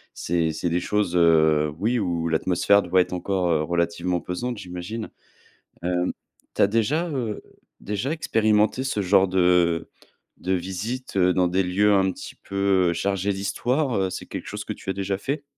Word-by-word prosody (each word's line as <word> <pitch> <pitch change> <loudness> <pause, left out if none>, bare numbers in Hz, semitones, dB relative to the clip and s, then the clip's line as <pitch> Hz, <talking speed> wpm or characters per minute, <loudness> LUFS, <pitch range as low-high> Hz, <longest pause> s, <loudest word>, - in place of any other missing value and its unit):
c'est 85 -1 0
c'est 85 +2 -2
des 85 +1 +1
choses, 100 -2 -1
heu, 80 -3 +4
oui, 115 +5 0
où 85 -4 -1
l'atmosphère 90 +5 +3
doit 90 +1 +3
être 90 - -3
encore, 90 -1 -1
heu, 80 - +2
relativement 85 +1 -1
pesante, 120 +8 -4
j'imagine. 90 +5 -6 0.7
Hem, 90 0 0 0.4
tu - - -4
as - - +7
déjà, 125 - 0
heu, 120 -8 -3 0.4
déjà 105 +8 -2
expérimenté 110 -4 +1
ce 135 -6 -1
genre 95 0 +4
de, 95 +1 -1
heu, 90 -2 +3 0.5
de 95 - -2
visites, 95 +7 -4
heu, 90 -1 +4
dans 90 -1 +2
des 95 +2 +1
lieux 100 +3 +3
un 95 -1 +3
petit - - -9
peu, 100 -2 +1
heu, - - 0
chargés 95 +3 -1
d'Histoire? 120 +7 -1
Heu, 95 -1 0
c'est - - -6
quelque - - -7
chose - - -5
que - - -4
tu - - -13
as - - +1
déjà 95 0 -2
fait? 145 +6 -3
95 Hz, 180 wpm, -24 LUFS, 90-105 Hz, 0.7 s, as